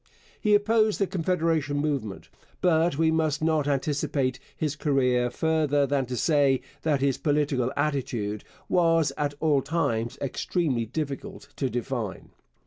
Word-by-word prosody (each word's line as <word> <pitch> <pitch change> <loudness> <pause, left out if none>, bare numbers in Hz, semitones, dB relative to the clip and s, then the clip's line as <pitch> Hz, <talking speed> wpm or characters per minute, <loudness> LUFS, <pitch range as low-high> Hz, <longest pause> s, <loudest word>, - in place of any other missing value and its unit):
He 210 -2 +4
opposed 215 +1 +3
the 200 - +3
Confederation 165 -5 0
movement. 140 -9 -2 0.3
But 165 -3 +2
we 160 0 +3
must 155 -2 0
not 155 -3 +1
anticipate 140 -2 0 0.2
his 150 -2 -1
career 125 -4 +1
further 150 -1 +1
than 135 -1 0
to 125 0 -4
say 140 -4 +3 0.2
that 150 -4 +1
his 135 -1 +1
political 145 -4 +1
attitude 120 -8 -1 0.2
was 165 -3 +3
at 145 -1 -2
all 150 -4 +3
times 120 -8 -1
extremely 135 -3 -1
difficult 155 - -5
to 135 - 0
define. 120 -4 -4
145 Hz, 135 wpm, -26 LUFS, 130-160 Hz, 0.3 s, He